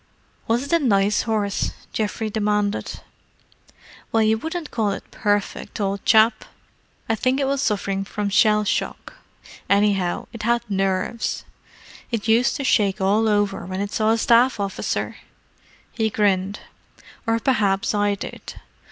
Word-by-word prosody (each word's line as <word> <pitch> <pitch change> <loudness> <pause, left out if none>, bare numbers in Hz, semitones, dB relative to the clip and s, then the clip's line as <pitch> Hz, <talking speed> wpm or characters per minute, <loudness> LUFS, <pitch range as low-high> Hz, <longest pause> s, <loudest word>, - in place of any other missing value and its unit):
"Was 235 +3 +1
it 280 - -7
a 335 - +5
nice 205 -3 +3
horse?" 205 -2 0 0.2
Geoffrey 215 0 -2
demanded. 210 -1 -1 1.1
"Well, 225 -1 +3
you 220 0 +3
wouldn't 320 +7 -5
call 220 -3 0
it 195 - -6
perfect, 205 0 -2
old 200 -1 -2
chap. 220 0 +5 0.6
I 225 - +1
think 255 +4 +1
it 275 - +1
was 275 0 0
suffering 200 -5 -1
from 205 0 -3
shell 210 +1 +4
shock: 210 - -3 0.6
anyhow, 200 -3 +2
it 230 - -7
had 235 +2 +1
nerves. 195 +2 -1 0.6
It 230 -3 -3
used 235 +4 +3
to 280 - -3
shake 200 -7 +2
all 210 +3 +2
over 205 -1 +1
when 185 0 -4
it 200 +1 -3
saw 215 0 +1
a 225 - +3
Staff 235 +1 +4
officer!" 200 -1 -3 0.7
He 220 -1 0
grinned. 200 -1 0 0.7
"Or 225 0 +2
perhaps 205 -6 +1
I 205 -1 +1
did. - - -8
210 Hz, 145 wpm, -22 LUFS, 200-230 Hz, 1.1 s, a